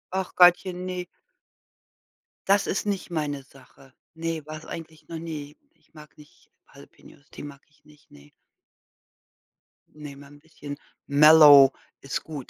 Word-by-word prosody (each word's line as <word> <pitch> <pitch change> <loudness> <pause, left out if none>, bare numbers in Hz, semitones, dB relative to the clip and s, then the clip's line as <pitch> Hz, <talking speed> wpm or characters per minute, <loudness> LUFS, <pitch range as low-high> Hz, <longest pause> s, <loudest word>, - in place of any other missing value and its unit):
Ach 190 -1 -4
Gottchen, 180 0 +3
ne 180 -1 -5 1.4
das 200 +1 +2
ist 195 - -3
nicht 200 -2 -4
meine 145 -4 -4
Sache. 135 0 -21 0.2
Ne, 165 -1 -4
war's 155 0 -10
eigentlich 160 -2 -11
noch 165 - -7
nie. 150 -3 -8 0.2
Ich - - -36
mag 150 -1 -16
nicht 150 -1 -21 0.2
Jalapeños, - - -19
die - - -10
mag 140 -1 -11
ich 150 0 -34
nicht, 150 -1 -23
ne? 70 0 -18 1.6
Ne, 150 -2 -11
mal 140 0 -15
'n 145 - -17
bisschen 145 -2 -11 0.3
mellow 145 -2 +7 0.3
ist 135 0 -5
gut. 145 -5 -9
150 Hz, 140 wpm, -24 LUFS, 145-165 Hz, 1.6 s, mellow